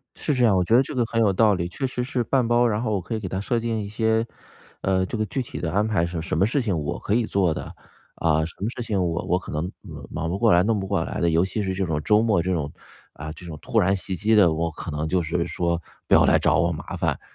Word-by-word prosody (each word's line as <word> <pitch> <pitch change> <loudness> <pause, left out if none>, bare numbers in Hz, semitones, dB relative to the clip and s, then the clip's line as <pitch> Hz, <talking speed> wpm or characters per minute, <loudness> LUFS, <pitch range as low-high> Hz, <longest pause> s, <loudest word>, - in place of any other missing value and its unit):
是 150 - -1
这 125 -2 +3
样， 105 -4 +4
我 90 - +3
觉 100 +6 +3
得 130 - +6
这 - - -7
个 125 -3 +1
很 115 0 -2
有 105 -4 +3
道 105 +1 +4
理。 85 -1 -2
确 130 +9 -3
实 125 -1 -3
是 125 -1 -1
半 125 -1 +1
包， 120 0 +4
然 105 -1 0
后 110 -3 -1
我 100 - 0
可 110 - -4
以 - - -2
给 100 - -5
它 95 +1 -3
设 115 +3 0
定 115 -1 -2
一 100 - -6
些， 110 +1 +1 0.6
呃， 95 -1 +1
这 115 - -4
个 110 - 0
具 130 +6 -3
体 125 - -7
的 80 - -2
安 105 +2 +2
排 100 -6 +1
是 85 -1 -4
什 80 - -2
么 95 - +4
事 130 +5 +1
情 100 -7 -1
我 75 -1 -3
可 - - -2
以 120 -1 +2
做 95 -6 +1
的。 - - -7 0.4
啊， 80 -1 +2
什 85 - -8
么 105 - -1
事 120 0 -6
情 100 -5 0
我 85 -1 -1
我 90 - +1
可 - - -9
能 80 +4 -2 0.4
忙 80 - -3
不 95 - -2
过 115 -3 +4
来、 85 - +5
弄 110 +1 +1
不 95 - -3
过 80 - 0
来 - - -5
的， 85 -1 +2
尤 80 +2 +3
其 95 +3 -2
是 95 -1 -1
这 95 - -1
种 75 -3 -2
周 105 0 +4
末 110 -6 +2
这 95 +2 -1
种， 75 -4 -2 0.4
啊， 75 +2 -7
这 85 - -12
种 80 -3 -7
突 - - 0
然 95 +2 +3
袭 95 0 -3
击 105 +5 +2
的， 90 -6 +5
我 85 +1 -1
可 - - -6
能 75 +1 -2
就 90 +2 +1
是 85 +2 -1
说 85 -1 -1 0.3
不 - - +1
要 - - +7
来 - - +5
找 - - +2
我 85 0 +2
麻 80 - -6
烦。 - - -1
95 Hz, 325 characters per minute, -24 LUFS, 85-110 Hz, 0.6 s, 要